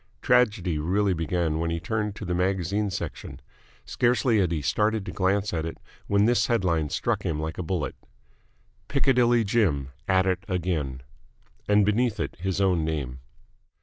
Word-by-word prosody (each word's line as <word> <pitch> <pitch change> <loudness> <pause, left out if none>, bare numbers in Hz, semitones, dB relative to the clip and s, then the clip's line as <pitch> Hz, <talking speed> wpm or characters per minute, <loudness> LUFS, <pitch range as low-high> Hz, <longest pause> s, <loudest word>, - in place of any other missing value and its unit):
Tragedy 105 -10 +2
really 95 +5 +1
began 80 -1 -1
when 85 0 -1
he 85 0 -2
turned 105 +2 -2
to 105 - -7
the 90 - -2
magazine 95 +3 0
section. - - -6 0.5
Scarcely 120 -2 +2
had 90 -4 +1
he 80 - 0
started 105 +6 +1
to - - -5
glance 100 +1 0
at 80 -2 -1
it 80 0 -5 0.3
when 100 +1 +3
this 120 0 +3
headline 90 - +1
struck - - -1
him 75 -2 -2
like 80 +2 -4
a - - 0
bullet: 85 -3 -2 0.9
PICCADILLY 120 -4 +3
JIM 95 - +1 0.2
AT 95 0 +3
IT 95 0 0
AGAIN 85 -9 -2 0.7
And 105 -1 +5
beneath 110 +2 +1
it - - -3
his 95 +1 -2
own 90 -4 +2
name. 70 -5 -3
95 Hz, 160 wpm, -26 LUFS, 85-105 Hz, 0.9 s, And